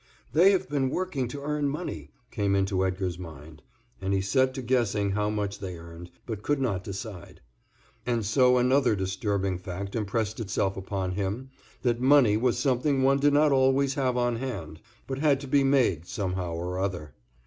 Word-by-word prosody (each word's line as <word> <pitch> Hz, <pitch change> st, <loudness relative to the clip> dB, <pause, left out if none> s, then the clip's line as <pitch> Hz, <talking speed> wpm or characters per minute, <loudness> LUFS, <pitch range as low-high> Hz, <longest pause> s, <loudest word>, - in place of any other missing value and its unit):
"They 175 Hz, +5 st, +6 dB
have 190 Hz, -7 st, +1 dB
been 135 Hz, -2 st, 0 dB
working 150 Hz, -6 st, -2 dB
to 140 Hz, +3 st, -7 dB
earn 150 Hz, -1 st, 0 dB
money," 155 Hz, +6 st, -5 dB, 0.2 s
came 100 Hz, -2 st, 0 dB
into 95 Hz, -1 st, +1 dB
Edgar's 95 Hz, -2 st, -2 dB
mind, 80 Hz, -3 st, -10 dB, 0.4 s
and 95 Hz, +1 st, -1 dB
he -, -, +2 dB
set 130 Hz, +7 st, +2 dB
to 130 Hz, -, -4 dB
guessing 110 Hz, -5 st, +1 dB
how 105 Hz, +1 st, 0 dB
much 105 Hz, -1 st, -3 dB
they 90 Hz, -3 st, -6 dB
earned, 85 Hz, +1 st, -11 dB, 0.2 s
but 110 Hz, -3 st, -5 dB
could 145 Hz, +5 st, 0 dB
not 100 Hz, -8 st, -1 dB
decide. 100 Hz, -2 st, -8 dB, 0.6 s
And 120 Hz, -3 st, -1 dB
so 125 Hz, +4 st, +4 dB
another 125 Hz, -1 st, +3 dB
disturbing 95 Hz, -1 st, -1 dB
fact 95 Hz, +2 st, -6 dB
impressed 110 Hz, 0 st, -2 dB
itself 100 Hz, -3 st, -1 dB
upon 95 Hz, -1 st, -3 dB
him, 100 Hz, +8 st, -3 dB, 0.3 s
that 120 Hz, -1 st, +1 dB
money 130 Hz, -5 st, +5 dB
was 120 Hz, +2 st, +1 dB
something 135 Hz, 0 st, +1 dB
one 135 Hz, +1 st, +4 dB
did 145 Hz, +1 st, +3 dB
not 150 Hz, +1 st, +4 dB
always 135 Hz, 0 st, +3 dB
have 130 Hz, -3 st, 0 dB
on 120 Hz, -1 st, +1 dB
hand, 95 Hz, -12 st, -6 dB, 0.2 s
but 135 Hz, 0 st, -4 dB
had 145 Hz, -2 st, +3 dB
to 140 Hz, -, -7 dB
be 140 Hz, +1 st, +3 dB
made 125 Hz, -, +2 dB
somehow 90 Hz, -4 st, -3 dB
or 90 Hz, +2 st, -3 dB
other. 85 Hz, -7 st, -3 dB
110 Hz, 180 wpm, -27 LUFS, 95-135 Hz, 0.6 s, They